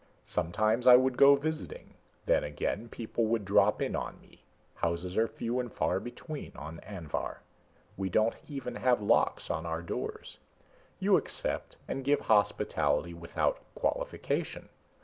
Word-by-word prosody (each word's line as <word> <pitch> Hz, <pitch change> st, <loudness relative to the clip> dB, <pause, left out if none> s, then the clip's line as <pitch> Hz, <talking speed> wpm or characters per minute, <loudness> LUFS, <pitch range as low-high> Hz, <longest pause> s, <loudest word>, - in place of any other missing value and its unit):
Sometimes 110 Hz, +8 st, +1 dB
I 125 Hz, -, +11 dB
would 130 Hz, 0 st, +4 dB
go 140 Hz, +2 st, +8 dB
visiting. 155 Hz, +2 st, -4 dB, 0.3 s
Then -, -, +3 dB
again, 75 Hz, +10 st, -3 dB
people 115 Hz, 0 st, -2 dB
would 110 Hz, -2 st, 0 dB
drop 100 Hz, +2 st, +3 dB
in -, -, -2 dB
on -, -, -4 dB
me -, -, -22 dB, 0.3 s
houses 85 Hz, +2 st, -2 dB
are 115 Hz, +1 st, +3 dB
few 120 Hz, +2 st, -3 dB
and 120 Hz, -3 st, -3 dB
far -, -, 0 dB
between 145 Hz, -, -7 dB
on 80 Hz, +2 st, -8 dB
Anvhar. 90 Hz, -7 st, -5 dB, 0.5 s
We 95 Hz, 0 st, -2 dB
don't 110 Hz, +4 st, +3 dB
even 135 Hz, -4 st, -5 dB
have 125 Hz, -3 st, +3 dB
locks -, -, +2 dB
on 80 Hz, -, -2 dB
our 80 Hz, +1 st, -3 dB
doors. 85 Hz, -, -5 dB, 0.6 s
You -, -, +4 dB
accept -, -, -3 dB
and 135 Hz, -, -3 dB
give 145 Hz, +2 st, +2 dB
hospitality 100 Hz, -4 st, +2 dB
without 85 Hz, -, -1 dB, 0.2 s
qualification. -, -, -2 dB
115 Hz, 145 wpm, -30 LUFS, 90-130 Hz, 0.6 s, I